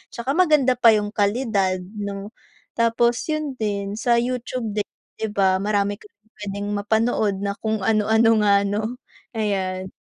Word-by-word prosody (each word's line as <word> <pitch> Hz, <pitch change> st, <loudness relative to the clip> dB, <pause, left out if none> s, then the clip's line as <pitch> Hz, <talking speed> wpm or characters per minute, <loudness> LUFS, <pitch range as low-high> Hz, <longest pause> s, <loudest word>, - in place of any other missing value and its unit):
Tsaka 235 Hz, +3 st, -2 dB
maganda 300 Hz, -8 st, +4 dB
pa 230 Hz, -2 st, +7 dB
yung 205 Hz, 0 st, -1 dB
kalidad 205 Hz, -3 st, 0 dB, 0.2 s
'no. 200 Hz, +1 st, -5 dB, 0.4 s
Tapos 235 Hz, +1 st, +2 dB
yun 305 Hz, -3 st, -2 dB
din 200 Hz, -1 st, -2 dB
sa 235 Hz, +1 st, +2 dB
YouTube 250 Hz, -1 st, -3 dB
din, 210 Hz, -1 st, 0 dB, 0.3 s
'di 220 Hz, -1 st, -3 dB
ba, 190 Hz, -2 st, +3 dB
marami 205 Hz, 0 st, 0 dB
kang 210 Hz, -, -19 dB, 0.2 s
puwedeng 205 Hz, 0 st, -5 dB
mapanood 220 Hz, -1 st, +1 dB
na 200 Hz, 0 st, -1 dB
kung 220 Hz, -2 st, -2 dB
ano-ano 220 Hz, +2 st, +3 dB
nga, 210 Hz, -1 st, +4 dB, 0.2 s
'no, 205 Hz, +2 st, -1 dB, 0.5 s
ayan. 190 Hz, -4 st, -2 dB
210 Hz, 145 wpm, -22 LUFS, 200-235 Hz, 0.5 s, pa